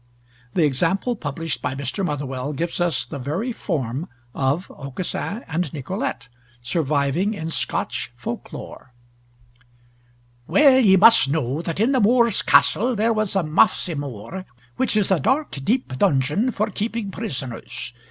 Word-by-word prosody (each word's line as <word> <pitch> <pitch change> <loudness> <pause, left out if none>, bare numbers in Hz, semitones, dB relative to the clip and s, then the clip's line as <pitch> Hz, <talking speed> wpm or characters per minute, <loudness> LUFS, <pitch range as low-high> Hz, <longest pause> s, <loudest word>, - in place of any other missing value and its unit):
The 175 - +3
example 175 - +1
published 160 -2 -4
by 135 - -2
Mr. 140 - -3
Motherwell 145 -3 -3
gives 170 +4 -3
us 170 -8 +1
the 145 - -7
very 165 - -2
form 150 - -3 0.2
of 140 +7 0
Aucassin 165 - -5
and 165 +3 -2
Nicolete, 190 - -4 0.4
surviving 150 - 0
in 160 -3 -4
Scotch - - -2
folk - - -6
lore: 125 -2 -10 1.5
"Well 275 -3 +6
ye 200 -7 +6
must 215 -8 +7
know 145 0 -1
that 170 +1 -4
in 230 +5 +3
the 260 -3 +2
Moor's 235 0 +4
Castle, 245 +4 +4
there 225 +2 +2
was 215 -2 +1
a 195 - +2
mafsymore, 155 - 0 0.3
which 255 -4 +1
is 200 -2 +1
a 185 - +4
dark 270 - +1
deep 225 - 0
dungeon 150 - +2
for 215 -3 0
keeping 215 0 -3
prisoners. 130 - -5
170 Hz, 140 wpm, -22 LUFS, 140-215 Hz, 1.5 s, must